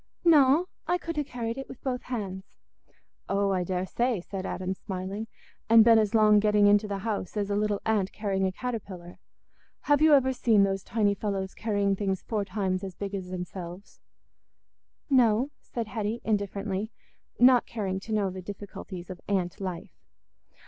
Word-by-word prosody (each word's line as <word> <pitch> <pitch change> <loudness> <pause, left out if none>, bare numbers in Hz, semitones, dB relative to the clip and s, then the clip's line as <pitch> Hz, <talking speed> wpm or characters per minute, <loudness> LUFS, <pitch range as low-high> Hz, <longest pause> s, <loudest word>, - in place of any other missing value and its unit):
"No; 300 0 +6 0.2
I 355 - +2
could 335 -2 -5
ha' 300 - 0
carried 235 -1 -4
it 270 - -7
with - - -11
both 255 -2 -2
hands." 195 -6 -6 0.7
"Oh, 200 0 +1
I 185 -2 +1
daresay," 190 +6 -1
said 190 +2 -6
Adam, 185 0 -3
smiling, 190 +3 -5 0.4
"and 225 -1 +8
been 230 -1 +7
as 215 0 +1
long 210 -1 +6
getting 210 0 +4
into 205 +1 +4
the 200 -1 -3
house 210 -2 -3
as 205 -1 -1
a - - +1
little 205 -1 0
ant 210 -4 +1
carrying 195 -2 -1
a - - -1
caterpillar. 190 -6 -6 0.6
Have 290 0 +2
you 310 -1 +7
ever 265 -1 +3
seen 225 -5 +3
those 195 0 0
tiny 205 -1 +1
fellows 195 -2 -3
carrying 205 -3 0
things 190 -2 -2
four 215 -3 -1
times 190 -2 -2
as 190 -2 -6
big 200 0 -5
as 190 -2 -4
themselves?" 180 +1 -7 1.1
"No," 250 -1 +3
said 235 -2 -4
Hetty, 220 +1 -2
indifferently, 200 -1 -2 0.5
not 250 -1 +6
caring 195 -4 -3
to 220 - -9
know 205 -3 +1
the 185 0 -7
difficulties 190 -1 -8
of 180 - -9
ant 185 -2 -1
life. 180 -3 -5
205 Hz, 170 wpm, -28 LUFS, 190-225 Hz, 1.1 s, and